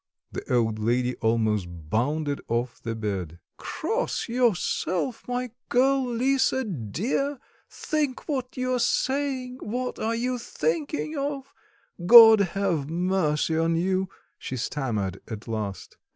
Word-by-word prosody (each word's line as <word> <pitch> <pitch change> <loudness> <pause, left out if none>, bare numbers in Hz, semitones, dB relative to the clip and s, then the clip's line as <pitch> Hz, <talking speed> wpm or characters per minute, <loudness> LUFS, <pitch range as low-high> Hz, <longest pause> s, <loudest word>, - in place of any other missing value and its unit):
The - - -6
old 110 -3 +1
lady 125 +3 +1
almost 110 -4 +1
bounded 125 - -2
off 120 +1 -2
the 115 -1 -4
bed. 95 -7 -4 0.2
"Cross 450 +9 -2
yourself, 235 -2 0
my 250 -1 -2 0.2
girl, 265 +2 +3
Lisa, 260 +2 +2
dear, 215 - -2 0.3
think 295 -4 -2
what 260 -5 -3
you 255 0 0
are 250 - +1
saying; 260 0 0
what 250 +4 -3
are 225 +1 0
you 250 +1 -1
thinking 310 - -2
of? 275 -1 -4 0.5
God 225 +2 +10 0.2
have 170 -8 0
mercy 165 -3 0
on 165 +1 +2
you!" 185 +2 0 0.3
she 130 - -5
stammered 110 -8 -2
at 110 0 -7
last. 105 -4 -5
190 Hz, 125 wpm, -26 LUFS, -, 0.5 s, God